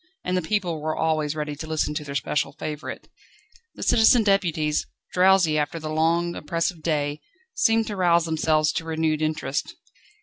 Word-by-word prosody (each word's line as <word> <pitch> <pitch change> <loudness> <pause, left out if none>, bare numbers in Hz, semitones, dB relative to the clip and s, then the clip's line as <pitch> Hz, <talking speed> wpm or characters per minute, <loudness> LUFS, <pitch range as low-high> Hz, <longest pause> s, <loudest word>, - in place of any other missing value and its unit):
And 180 - -1
the 180 - +1
people 175 -3 -1
were 155 +1 -2
always 155 -2 0
ready 150 -1 -3
to 155 +2 -7
listen 155 -1 -1
to 150 - -3
their 140 -1 -7
special 140 0 -1
favourite. 150 0 -6 0.7
The - - -6
citizen 225 +1 +5
deputies, 165 -7 +1 0.3
drowsy 180 -4 +4
after 150 +3 -2
the 155 -1 -5
long, 165 +2 +1
oppressive 165 +2 -2
day, 150 -2 -1 0.3
seemed 225 - +2
to 210 -2 -5
rouse 170 -3 +3
themselves 155 -1 +1
to 165 - -3
renewed 160 -1 0
interest. 155 - -2
160 Hz, 165 wpm, -24 LUFS, 150-175 Hz, 0.7 s, citizen